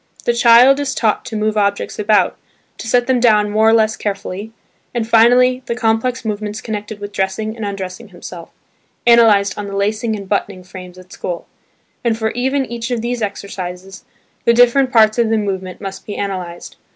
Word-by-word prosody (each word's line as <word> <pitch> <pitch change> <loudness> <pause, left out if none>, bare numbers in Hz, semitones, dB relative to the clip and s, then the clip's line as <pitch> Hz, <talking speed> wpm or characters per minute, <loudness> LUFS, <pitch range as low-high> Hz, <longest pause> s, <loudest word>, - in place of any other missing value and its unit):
The 240 - +2
child 240 +3 +6
is 275 -2 -2
taught 220 -3 0
to 225 - -6
move 215 0 0
objects 200 0 -1
about, 210 0 +2 0.4
to - - -7
set 245 +1 +2
them 255 -1 +1
down 210 -3 +3
more 220 +1 +4
or - - +4
less 220 -1 +3
carefully, 200 +1 -5 0.4
and 230 -2 -1
finally 245 +3 +4
the 235 - -2
complex 235 +1 0
movements 210 0 -3
connected 210 -1 -6
with 205 0 -7
dressing 205 +2 -2
and 225 - -7
undressing 200 +2 -5
himself 175 -2 -10 0.6
(analysed 220 -5 +4
on 205 - -4
the 200 - -6
lacing 215 +3 -1
and 200 -2 -8
buttoning 195 -2 -2
frames 185 0 -11
at 185 0 -14
school), 175 -1 -5 0.6
and 230 -2 +1
for 220 -1 -1
even 265 +2 -1
each 235 0 -5
of 240 -2 -2
these 240 0 -3
exercises, 190 -2 -6 0.4
the 235 - +3
different 245 +2 +4
parts 220 -1 +4
of 230 -2 +2
the 225 - +2
movement 190 -3 -4
must 195 -1 -8
be 205 - -5
analysed. 185 -3 -5
215 Hz, 185 wpm, -17 LUFS, 200-235 Hz, 0.6 s, child